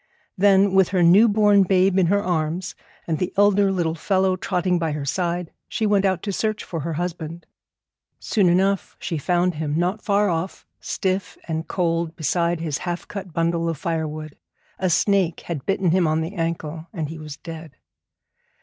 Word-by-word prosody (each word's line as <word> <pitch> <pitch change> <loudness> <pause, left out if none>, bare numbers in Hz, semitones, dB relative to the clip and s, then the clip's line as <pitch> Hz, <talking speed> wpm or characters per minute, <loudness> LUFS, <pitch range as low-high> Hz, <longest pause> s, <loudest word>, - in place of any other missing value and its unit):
Then, 195 -1 +4
with 190 -2 +4
her 185 -2 +2
new 190 +7 +7
born 205 -1 +4
babe 190 0 +3
in 180 - +3
her 200 +3 +2
arms 175 +1 -1 0.3
and 160 -2 -2
the 180 0 -1
elder 205 -1 +4
little 170 -4 0
fellow 190 +3 +1
trotting 180 -1 0
by 160 -2 -1
her 145 -2 -4
side, 175 +2 -2 0.2
she 220 - -1
went 205 -1 +3
out 185 -3 0
to 205 - -2
search 215 +1 -1
for 165 - -5
her 160 +2 -3
husband. 170 0 -5 0.7
Soon 200 -6 +1
enough 190 +2 +1
she 165 -4 -3
found 180 +4 +1
him, 150 -1 -2
not 180 +5 0
far 205 0 +2
off, 170 +1 -3
stiff 190 0 -2
and 160 -1 -3
cold 165 -2 -1
beside 170 +2 0
his 155 -3 -2
half 175 -1 -4
cut 195 -3 -7
bundle 165 +1 0
of 165 - -3
firewood. 155 -1 -4 0.4
A 185 - +1
snake 185 -1 +2
had 155 -6 -6
bitten 195 -3 +1
him 180 -1 +3
on 155 +1 +1
the 165 +4 -4
ankle, 165 -2 -3
and 160 -7 -3
he 160 0 -7
was 150 -2 -8
dead. 165 -3 -10
175 Hz, 180 wpm, -23 LUFS, 165-190 Hz, 0.7 s, new